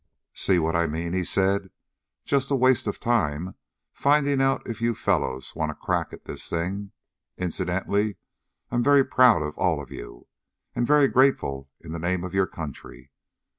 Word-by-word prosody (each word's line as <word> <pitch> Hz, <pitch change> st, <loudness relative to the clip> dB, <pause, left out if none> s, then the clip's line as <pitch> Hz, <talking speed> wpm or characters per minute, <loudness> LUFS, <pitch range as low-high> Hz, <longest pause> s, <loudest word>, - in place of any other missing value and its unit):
"See 95 Hz, -, +2 dB
what 80 Hz, 0 st, 0 dB
I 85 Hz, 0 st, +2 dB
mean?" 85 Hz, +3 st, -3 dB
he 95 Hz, 0 st, 0 dB
said. 95 Hz, +1 st, +1 dB, 0.6 s
"Just 140 Hz, -1 st, +1 dB
a 140 Hz, -, +2 dB
waste 130 Hz, -3 st, +3 dB
of 105 Hz, -, -3 dB
time 90 Hz, -7 st, 0 dB, 0.4 s
finding 140 Hz, -1 st, +2 dB
out 135 Hz, 0 st, +1 dB
if 115 Hz, -1 st, -5 dB
you 115 Hz, 0 st, +1 dB
fellows 65 Hz, -8 st, -1 dB
want 80 Hz, -1 st, -1 dB
a -, -, -11 dB
crack -, -, -2 dB
at -, -, -12 dB
this -, -, -5 dB
thing. 95 Hz, +4 st, -3 dB, 0.5 s
Incidentally, 95 Hz, +3 st, -1 dB, 0.5 s
I'm 120 Hz, 0 st, +1 dB
very 140 Hz, +1 st, +5 dB
proud 125 Hz, -10 st, +5 dB
of 75 Hz, 0 st, -5 dB
all -, -, +2 dB
of -, -, -9 dB
you, -, -, -10 dB, 0.5 s
and 120 Hz, -, 0 dB
very 150 Hz, -1 st, +5 dB
grateful 70 Hz, -, +1 dB
in 80 Hz, -, -10 dB
the 85 Hz, -, -4 dB
name 90 Hz, +2 st, -1 dB
of 90 Hz, -, -6 dB
your 95 Hz, -1 st, +2 dB
country. 70 Hz, -4 st, -9 dB
95 Hz, 170 wpm, -25 LUFS, 80-120 Hz, 0.6 s, very